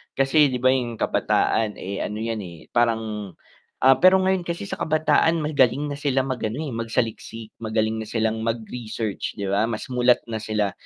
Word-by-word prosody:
kasi 145 +2 +4
di 130 - -2
ba 130 - +6
yung 120 -3 -1
kabataan 110 -1 +1
eh, 100 +1 -5
ano 105 - -3
yan 115 -1 -2
eh, 85 -4 -11
parang 110 -4 0 0.5
ah, 130 0 +6
pero 185 +1 +7
ngayon 190 0 +1
kasi 170 +3 -3
sa 195 - -6
kabataan 160 +1 +2
magaling 145 -1 +2
na - - -2
sila 135 -2 +1
mag-ano, 125 -3 -3
eh, 145 - -5
magsaliksik 115 -1 -3
magaling 110 0 -1
na 110 - -7
silang 110 -1 0
mag-research 115 -1 -4
di 100 - -4
ba, 100 +3 +1
mas 110 -2 -4
mulat 125 0 +4
na 115 -2 -4
sila 105 -2 -1
115 Hz, 175 wpm, -23 LUFS, 110-135 Hz, 0.5 s, pero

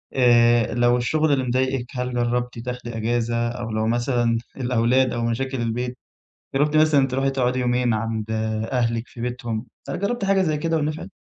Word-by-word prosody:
آآ 120 -2 +4
لو 120 0 +3
الشغل 155 +5 +1
اللي 135 -2 +1
مضايقِك 130 0 0
هل 125 0 -2
جرّبتِ 120 0 -1
تاخدي 120 -1 -5
إجازة، 115 +1 0
أو 120 -1 -5
لو 110 0 0
مثلًا 120 0 +1 0.2
الأولاد 125 0 +2
أو 120 - -1
مشاكل 130 +2 -2
البيت، 125 +2 -2 0.6
جرّبتِ 150 +2 +2
مثلًا 155 -3 +4
تروحي 135 +1 0
تقعدي 130 -1 0
يومين 125 -1 +1
عند 110 0 -2 0.5
أهلِك 115 -2 0
في 120 - -12
بيتهم 120 -1 -3 0.2
هل - - -3
جرّبتِ 205 +2 -1
حاجة 195 -1 +3
زي 155 -4 +1
كده 165 +2 0
ونفعت؟ 155 0 -3
125 Hz, 165 wpm, -23 LUFS, 120-135 Hz, 0.6 s, آآ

